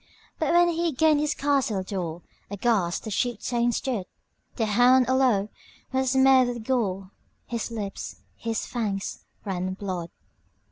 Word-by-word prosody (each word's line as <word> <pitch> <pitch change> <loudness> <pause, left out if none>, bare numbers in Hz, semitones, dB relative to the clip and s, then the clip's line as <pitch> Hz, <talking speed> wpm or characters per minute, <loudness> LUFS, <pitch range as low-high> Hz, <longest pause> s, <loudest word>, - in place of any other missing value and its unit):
But, - - +1
when 345 0 +6
he 335 0 0
gained 305 +2 +4
his 300 0 0
castle 270 -9 +1
door, 175 -4 -4 0.3
Aghast 200 -4 0
the 220 - -5
chieftain 240 +2 0
stood; 230 -5 -2 0.5
The 225 - 0
hound 245 +4 +5
all 260 +1 +3
o'er 210 -6 +2 0.4
was 260 0 +1
smeared 265 -1 +6
with 240 -2 -4
gore, 195 -6 -1 0.3
His 235 -1 -3
lips, 210 -4 -5 0.2
his 225 -1 -3
fangs, 210 -5 -3 0.2
ran 185 -1 -2
blood. 185 -4 -4
235 Hz, 140 wpm, -26 LUFS, 195-260 Hz, 0.5 s, when